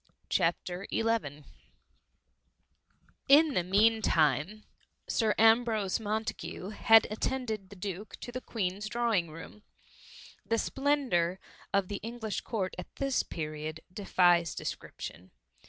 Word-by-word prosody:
CHAPTER 175 +2 0
XI, 225 -11 -1 1.9
In 295 +1 +7
the 180 - +2
mean 215 +5 +3
time, 155 - +1 0.4
Sir 220 -3 +1
Ambrose 225 -3 +3
Montagu 220 -2 -4
had 225 +1 +6
attended 220 -3 -3
the 205 - -11
Duke 195 +2 -6
to 245 - -6
the 255 +1 -5
Queens's 205 -2 -3
drawing 230 -7 +1
room. 165 +6 -11 0.8
The 230 - 0
splendour 250 -11 +1 0.3
of 195 -2 +2
the 205 - -4
English 225 -1 -4
Court 195 -5 -3
at - - -9
this 275 -1 +1
period. 155 0 -5
defies 175 -4 +3
description. 90 +2 -7
210 Hz, 110 wpm, -30 LUFS, 175-230 Hz, 1.9 s, In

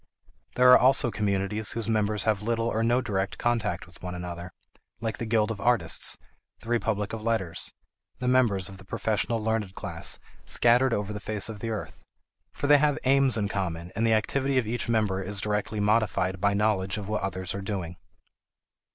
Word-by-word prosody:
There 125 0 +7
are - - +9
also 130 -1 +4
communities 105 +1 -1
whose 115 -2 -3
members 105 -2 +1
have 105 -3 +1
little 115 +1 -1
or 110 -1 0
no 120 +2 +2
direct 100 -5 -2
contact 120 -1 -1
with - - -19
one 90 0 -5
another, 90 0 -6 0.5
like 115 0 -3
the 115 - -3
guild 110 -1 +2
of 105 -3 -5
artists, 110 -9 +2 0.4
the 115 - -10
republic 110 -3 0
of 110 - -4
letters, 110 -7 -2 0.5
the 125 - -3
members 115 -7 +3
of 95 -1 -10
the - - -12
professional 110 +3 -1
learned 105 -4 -1
class - - -3 0.3
scattered 120 +2 +3
over 105 -2 -1
the 105 - -5
face 105 0 -3
of 110 -2 -7
the 115 - -4
earth. 110 -2 -6 0.5
For - - -5
they 145 0 +6
have 145 0 +2
aims 135 -1 +3
in 105 -2 0
common, 90 -4 -3
and 110 - 0
the 115 -1 +4
activity 135 +5 0
of 125 - +2
each 120 +2 -2
member 105 -4 +1
is 100 +1 +1
directly 105 +1 -1
modified 100 -3 +1
by 100 0 +2
knowledge 100 -2 +1
of 100 -2 -6
what 105 0 -1
others 95 -2 -3
are 100 - -4
doing. 95 -4 -4
105 Hz, 190 wpm, -27 LUFS, 100-115 Hz, 0.5 s, are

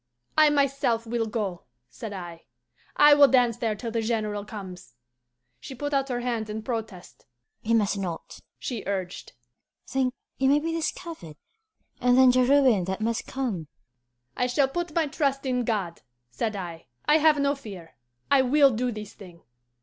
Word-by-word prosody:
'I 310 -1 +6
myself 275 -5 +1
will 230 0 -1
go,' 205 -5 -3 0.2
said 165 - -8
I; 175 -4 -8 0.5
'I 295 0 +8
will 290 -1 +7
dance 245 -3 +3
there 225 -3 -1
till 230 +2 -5
the 230 0 -1
General 215 -2 -2
comes.' 190 - -9 0.6
She 265 - -9
put 290 +3 -4
out 275 -1 +1
her 245 -1 -2
hand 230 -3 -2
in 215 +1 -5
protest. 220 -6 -6 0.3
'You 230 +1 +1
must 205 -2 +1
not,' 175 -4 -6 0.2
she 240 -5 -5
urged. 190 -3 -4 0.5
'Think: 260 -1 -1 0.2
you 265 0 +3
may 285 - +5
be 325 +2 -2
discovered, 320 - -5 0.6
and 250 0 +3
then 260 -1 +7
the 255 0 +3
ruin 255 -8 +4
that 190 +1 -3
must 230 +2 -1
come!' 225 - -3 0.7
"'I 250 - +1
shall 270 +2 +2
put 340 +3 -4
my 330 -2 +3
trust 275 -2 -1
in 250 -1 0
God,' 195 -7 -2 0.3
said 210 - -2
I. 170 -4 -7 0.2
'I 300 - +5
have 310 -1 +5
no 280 0 +2
fear. 190 - -10 0.4
I 280 -1 +6
will 275 +2 +5
do 245 +2 -1
this 210 -2 -8
thing. 180 -5 -14
235 Hz, 170 wpm, -26 LUFS, 205-275 Hz, 0.7 s, I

